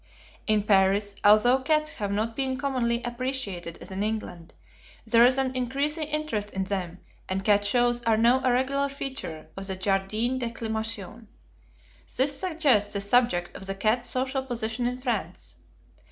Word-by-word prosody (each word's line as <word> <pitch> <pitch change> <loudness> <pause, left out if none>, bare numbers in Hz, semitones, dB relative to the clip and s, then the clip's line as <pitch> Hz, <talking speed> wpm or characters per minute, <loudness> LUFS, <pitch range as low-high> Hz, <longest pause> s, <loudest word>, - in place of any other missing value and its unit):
In 215 -1 +3
Paris, 200 0 +3
although 215 +5 +6
cats 305 +3 +1
have 205 -2 -3
not 220 +3 -1
been 265 0 -1
commonly 245 -4 0
appreciated 240 -9 -4
as - - -8
in 190 +1 -3
England, 210 -6 -4 0.5
there 235 0 +5
is 255 +1 +2
an 260 -1 0
increasing 280 +5 -1
interest 300 -9 -2
in 190 -1 -2
them, 185 -3 -4 0.3
and 190 0 -2
cat 205 -1 +4
shows 240 +2 +2
are 225 -2 +2
now 240 +4 +4
a 255 - +3
regular 275 +3 +1
feature 265 - -6
of 195 0 -6
the 190 - -3
Jardin 200 +6 0
d'Acclimation. 225 -2 -4 0.9
This 280 +2 +3
suggests 300 - +2
the 200 - -1
subject 200 -5 +2
of 195 - -7
the 195 - -3
cat's 220 +5 0
social 265 +1 -1
position 240 -2 -2
in 250 0 -2
France. 250 -1 -4
230 Hz, 155 wpm, -26 LUFS, 205-260 Hz, 0.9 s, although